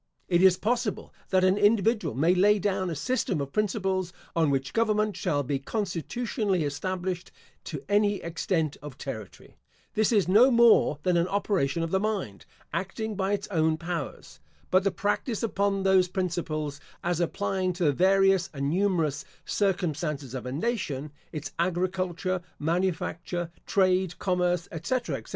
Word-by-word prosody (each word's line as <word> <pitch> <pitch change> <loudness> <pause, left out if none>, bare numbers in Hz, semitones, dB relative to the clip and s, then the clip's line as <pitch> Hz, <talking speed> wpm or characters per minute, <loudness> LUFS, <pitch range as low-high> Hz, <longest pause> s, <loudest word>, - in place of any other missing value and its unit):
It 175 -1 +3
is 185 -1 +6
possible 235 -1 -1 0.2
that 185 -1 +3
an 185 +2 +3
individual 210 - +2
may 160 +7 +3
lay 205 +3 +4
down 195 -2 -1
a 165 - -3
system 190 - -1
of 140 -1 -4
principles, 190 -3 0 0.2
on 165 -3 +3
which 135 -1 -1
government 215 -2 +1
shall 155 -6 0
be 135 +1 -1
constitutionally 200 - -2
established 180 +4 -3 0.3
to - - -6
any 205 0 +3
extent 165 -3 -2
of 145 -2 -9
territory. 110 -10 -8 0.4
This 215 +1 +2
is 205 -6 +3
no 220 +8 +6
more 235 - +5
than 180 -2 +2
an 170 +1 +2
operation 185 -6 0
of 165 - -3
the 190 - +2
mind, 195 - -3 0.3
acting 195 +6 -3
by 195 +1 0
its 200 0 -2
own 160 -4 +2
powers. 165 - -5 0.3
But 185 +1 +4
the 195 - +3
practice 205 +4 -2
upon 200 -3 0
those 190 -1 +4
principles, 165 -5 -3 0.2
as 175 -1 0
applying 185 +1 0
to 175 +1 -3
the 145 -3 +4
various 195 +1 +3
and 140 +1 -1
numerous 165 -6 +1 0.2
circumstances 160 - -1
of 130 -1 -5
a - - -4
nation, 150 - -2 0.2
its 155 -2 -5
agriculture, 185 +1 -1 0.2
manufacture, 175 +1 -2 0.2
trade, 185 -2 +2
commerce, 180 -2 0
etc., 240 +10 -2
etc. - - -12
185 Hz, 150 wpm, -27 LUFS, 160-200 Hz, 0.4 s, is